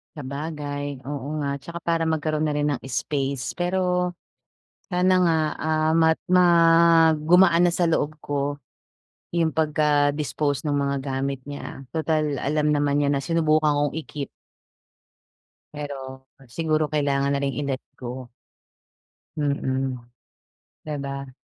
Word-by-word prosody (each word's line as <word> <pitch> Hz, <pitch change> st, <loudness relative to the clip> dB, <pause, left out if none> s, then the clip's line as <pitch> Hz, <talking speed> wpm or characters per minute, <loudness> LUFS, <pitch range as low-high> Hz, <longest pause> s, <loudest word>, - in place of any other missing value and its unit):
Sabagay, 145 Hz, -1 st, -5 dB
oo 140 Hz, -2 st, -4 dB
nga 140 Hz, -1 st, -2 dB
'tsaka 170 Hz, +4 st, -8 dB
para 165 Hz, -1 st, +1 dB
magkaroon 155 Hz, -1 st, 0 dB
na 150 Hz, -, -1 dB
rin 145 Hz, 0 st, +1 dB
ng 135 Hz, -, -3 dB
space. 135 Hz, +1 st, -2 dB
Pero 180 Hz, 0 st, 0 dB, 0.8 s
sana 180 Hz, +1 st, +3 dB
nga, 165 Hz, -2 st, +3 dB, 0.2 s
ah, 155 Hz, 0 st, +1 dB
mag 160 Hz, -1 st, +4 dB, 1.1 s
gumaan 175 Hz, 0 st, +6 dB
na 175 Hz, -, +2 dB
sa 175 Hz, -2 st, +2 dB
loob 155 Hz, -2 st, 0 dB
ko 145 Hz, 0 st, -2 dB, 0.7 s
yung 165 Hz, -2 st, +1 dB
pagka-dispose 150 Hz, -2 st, +1 dB
nung 145 Hz, -1 st, +1 dB
mga 140 Hz, 0 st, 0 dB
gamit 135 Hz, 0 st, -3 dB
niya. 140 Hz, -1 st, -7 dB
Tutal 155 Hz, -2 st, 0 dB
alam 150 Hz, +1 st, 0 dB
naman 145 Hz, 0 st, +1 dB
niya 140 Hz, -1 st, +2 dB
na 140 Hz, -, 0 dB
sinubukan 155 Hz, -1 st, +2 dB
kong 145 Hz, +1 st, 0 dB
i-keep. 150 Hz, -3 st, -5 dB, 1.5 s
Pero, 135 Hz, -3 st, -7 dB, 0.2 s
siguro 155 Hz, +3 st, 0 dB
kailangan 140 Hz, -2 st, +1 dB
na -, -, 0 dB
ring 140 Hz, +1 st, -2 dB
i-let 135 Hz, -2 st, -3 dB, 0.2 s
go. 125 Hz, 0 st, -6 dB, 1.1 s
Mm 135 Hz, -3 st, -1 dB, 0.9 s
di 150 Hz, -, -3 dB
ba? 140 Hz, -1 st, -6 dB
145 Hz, 125 wpm, -24 LUFS, 140-160 Hz, 1.5 s, gumaan